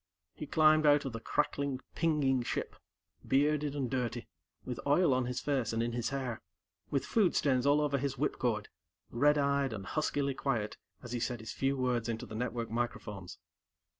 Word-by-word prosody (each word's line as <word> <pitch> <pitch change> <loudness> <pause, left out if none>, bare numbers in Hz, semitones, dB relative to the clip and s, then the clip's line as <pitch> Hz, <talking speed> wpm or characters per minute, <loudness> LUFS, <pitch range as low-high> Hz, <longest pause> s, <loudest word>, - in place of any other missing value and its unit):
He 150 - -7
climbed 155 0 +5
out 145 0 +5
of 135 - -4
the 115 - -4
crackling, 140 +3 -1
pinging 145 -6 +2
ship, 120 - -3 0.5
bearded 145 +1 +2
and 135 -3 -1
dirty, 125 -2 -2 0.4
with 125 -2 -4
oil 145 0 +4
on 130 0 +1
his 125 0 -2
face 135 -6 0
and 115 +1 +1
in 120 - -1
his 120 0 -1
hair, 130 -4 -3 0.5
with 140 - 0
food 205 -6 +2
stains 130 -2 +2
all 145 +1 +5
over 145 -2 +1
his 135 0 -2
whipcord, 120 -6 -1 0.4
red 145 +5 +4
eyed, 140 -3 +1
and 100 -3 -6
huskily 140 +2 0
quiet 120 -6 -1 0.3
as 120 - -8
he 120 - -1
said 120 0 -2
his 110 - -7
few 135 +1 0
words 125 -2 0
into 115 -1 -3
the - - -10
network 115 0 -3
microphones. 110 -6 -4
130 Hz, 180 wpm, -32 LUFS, 120-145 Hz, 0.5 s, climbed